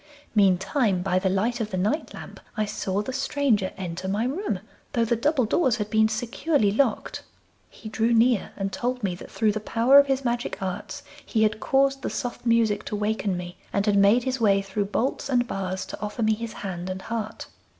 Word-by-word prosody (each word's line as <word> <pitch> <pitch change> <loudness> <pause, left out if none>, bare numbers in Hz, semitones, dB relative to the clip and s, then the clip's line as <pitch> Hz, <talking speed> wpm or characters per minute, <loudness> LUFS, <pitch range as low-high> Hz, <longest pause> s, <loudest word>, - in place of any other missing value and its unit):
Meantime, 195 0 +2
by 185 -1 +1
the 190 0 0
light 225 +6 0
of 215 - -2
the 185 - -3
night 210 - -1
lamp, - - -10 0.2
I 215 - +1
saw 205 -1 -2
the 260 - -5
stranger 260 -7 +1
enter 185 0 -5
my 205 +4 0
room, 265 - -2 0.3
though 230 -1 +2
the 235 - +1
double 270 +2 +1
doors 250 +1 +2
had 210 -2 -4
been 220 0 +4
securely 235 +2 0
locked. 235 +2 0 0.5
He - - -12
drew 225 +2 0
near 235 -1 +3
and 195 0 -3
told 250 0 -2
me 190 -3 0
that 175 - -10
through 220 -2 +1
the 215 - -3
power 235 +6 +5
of 280 - +4
his 270 -1 0
magic 240 0 -2
arts 185 -1 -5 0.2
he 220 -2 +1
had 215 0 +1
caused 270 +1 +2
the - - -2
soft 245 -1 -4
music 230 -3 +3
to - - -3
waken 205 -2 -1
me, 175 0 -8
and 200 0 0
had 210 -2 +3
made 200 +5 +5
his 260 -1 -2
way 200 -2 +4
through 200 +1 -2
bolts 240 +7 -2
and 245 -2 +2
bars 190 -2 -3
to - - -9
offer 210 +2 -3
me 220 0 +3
his 225 0 -5
hand 180 -1 -4
and 185 0 -5
heart. 225 -1 -4
215 Hz, 210 wpm, -25 LUFS, 195-240 Hz, 0.5 s, power